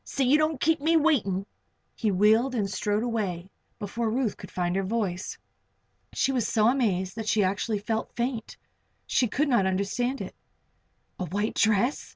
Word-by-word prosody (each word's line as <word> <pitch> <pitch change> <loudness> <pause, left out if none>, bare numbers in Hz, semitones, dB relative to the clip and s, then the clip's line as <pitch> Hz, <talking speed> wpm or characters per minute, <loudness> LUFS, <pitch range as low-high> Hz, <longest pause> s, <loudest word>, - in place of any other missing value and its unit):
See 275 - -1
you 285 +5 +4
don't 310 -2 +1
keep 320 +1 +2
me 325 +2 +3
waiting." 215 - +1 0.5
He 220 - 0
wheeled 220 +7 +3
and 205 -4 0
strode 205 +2 -1
away 195 -6 -3 0.3
before 225 +2 -2
Ruth 235 -2 0
could - - -11
find 175 0 -1
her 195 - +1
voice. 195 -3 -2 0.8
She 270 - +1
was 245 -4 0
so 220 +1 +3
amazed 195 -8 0
that 220 -1 -4
she 210 -1 +3
actually 200 +3 0
felt 220 +2 -3
faint 240 -2 -3 0.5
She 250 - +2
could 290 +8 0
not 235 -8 +3
understand 200 +8 -1
it. - - -6 0.9
A 185 - -2
white 205 +6 -2
dress! 220 +5 +1
220 Hz, 170 wpm, -27 LUFS, 195-250 Hz, 0.9 s, you